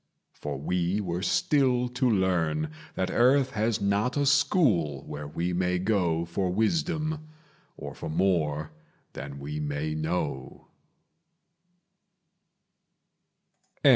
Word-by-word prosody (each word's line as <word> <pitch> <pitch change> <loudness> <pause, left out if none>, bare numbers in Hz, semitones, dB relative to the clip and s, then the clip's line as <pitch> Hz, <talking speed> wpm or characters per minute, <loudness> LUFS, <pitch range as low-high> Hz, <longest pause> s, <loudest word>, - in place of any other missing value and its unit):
For - - -5
we 90 +6 0
were 90 -3 -2
still 125 +2 +2
to 125 +1 +1
learn 85 -7 +1 0.2
That 95 0 -1
earth 130 +2 +4
has 110 0 0
not 100 +7 +1
a 145 - +2
school 125 - +3
where 75 0 -6
we 85 +4 -2
may 90 0 +1
go 90 -4 +1
For 90 +2 -1
wisdom, 155 - 0 0.5
or - - -7
for - - -6
more 80 -3 +1 0.4
than 70 0 -7
we 75 +2 -5
may 75 +1 -2
know. 75 -4 -3
90 Hz, 110 wpm, -28 LUFS, 80-120 Hz, 0.5 s, earth